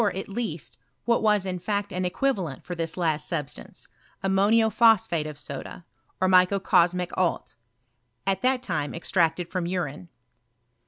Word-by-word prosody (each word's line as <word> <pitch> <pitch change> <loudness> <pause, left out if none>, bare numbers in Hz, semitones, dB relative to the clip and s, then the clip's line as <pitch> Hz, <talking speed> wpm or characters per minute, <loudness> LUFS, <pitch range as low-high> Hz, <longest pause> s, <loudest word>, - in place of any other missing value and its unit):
at 190 - -4
least, 195 - -5 0.3
what 235 -1 +2
was 210 -3 +3
in 180 -1 -3
f>tct 200 +1 -2
an 185 0 -1
equivalent 180 - -1
for 180 - -6
this 165 -1 -4
last 160 -4 0
substauce, 150 -4 -5 0.4
ammoido 205 +4 +3
pkospkute 195 -10 +3
of 150 - -9 0.2
$oda, 165 +5 -9 0.3
or 185 - +2
microcos 180 -1 +4
mic 180 -1 -3
lalt, 180 -2 -1 0.7
at 195 0 0
that 255 0 +1
lime 145 -1 -2
extracted 170 0 +1
from 185 -2 -2
Brine. 175 -2 -3
185 Hz, 145 wpm, -26 LUFS, 170-200 Hz, 0.7 s, microcos